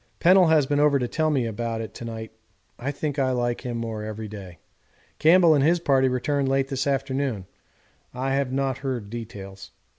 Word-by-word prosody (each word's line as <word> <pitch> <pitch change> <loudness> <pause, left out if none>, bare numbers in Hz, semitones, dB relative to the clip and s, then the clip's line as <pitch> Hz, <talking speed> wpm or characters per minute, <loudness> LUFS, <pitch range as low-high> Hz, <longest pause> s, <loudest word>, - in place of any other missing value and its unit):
Pennell 185 0 +6
has 155 -3 +4
been 145 +1 0
over 145 -1 +4
to 125 -2 -1
tell 155 +4 0
me 135 -5 +1
all 115 - -3
about 115 +1 -3
it 110 -1 -6
to - - -9
night; 110 -1 -6 0.5
I 125 +4 -3
think 145 0 -3
I 130 -1 +2
like 120 -1 -1
him 120 -2 -4
more 115 -2 -4
every 110 0 -6
day. 95 -4 -10 0.6
Campbell 170 0 +6
and 140 -2 +3
his 170 +4 +3
party 135 -5 +3
returned 135 +2 0
late 135 0 +1
this 135 +1 -2
afternoon 135 -6 -1 0.7
I 130 +2 -2
have 135 -2 0
not 135 -1 -1
heard 125 -7 -4
details. 100 -4 -8
130 Hz, 200 wpm, -24 LUFS, 115-140 Hz, 0.7 s, Pennell